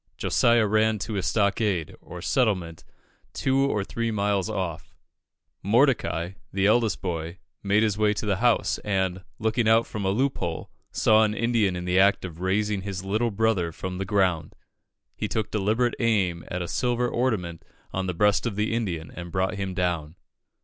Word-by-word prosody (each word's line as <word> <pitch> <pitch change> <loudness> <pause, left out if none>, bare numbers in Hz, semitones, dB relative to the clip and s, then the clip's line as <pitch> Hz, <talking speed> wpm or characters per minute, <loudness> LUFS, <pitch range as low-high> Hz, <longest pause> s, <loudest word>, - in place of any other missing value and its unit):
Josiah 115 -1 +3
ran 110 +1 +2
to 105 +2 -4
a 100 - 0
stockade, 100 -2 0
or 90 -1 -9
settlement, 95 - 0 0.5
two 135 0 +1
or 135 -7 +1
three 115 +3 -3
miles 100 -2 0
off; 90 -6 -4 0.7
Mordecai, 85 +2 +2 0.2
the 95 0 0
eldest 110 0 +2
boy, 85 -1 -3 0.2
made 100 +2 +2
his 105 -1 0
way 105 -1 +3
to 105 - -4
the 100 -2 +1
house, 120 +2 +2
and, 95 -2 -1
looking 110 +1 0
out 115 +1 +5
from 105 - -5
a 95 - +1
loop 130 +7 0
hole, 85 -2 -4 0.2
saw 110 0 +4
an 105 0 0
Indian 115 -5 +1
in 90 0 -5
the 90 +1 +2
act 100 0 +3
of 85 -1 -9
raising 100 +2 0
his 95 -1 -5
little 110 +4 0
brother 105 -5 0
from 90 +2 -6
the - - -1
ground. 95 -5 0 0.6
He - - -3
took 110 -2 -2
deliberate 110 +4 +1
aim 95 -7 +1
at 90 0 -3
a - - -5
silver 120 +3 0
ornament 110 -10 -1 0.3
on 95 0 -2
the 90 - -2
breast 105 +5 +2
of 110 - -3
the 105 +2 0
Indian, 90 -9 -3
and 85 -1 -8
brought 95 +2 0
him 95 -2 -3
down. 85 -4 -1
100 Hz, 175 wpm, -25 LUFS, 90-110 Hz, 0.7 s, out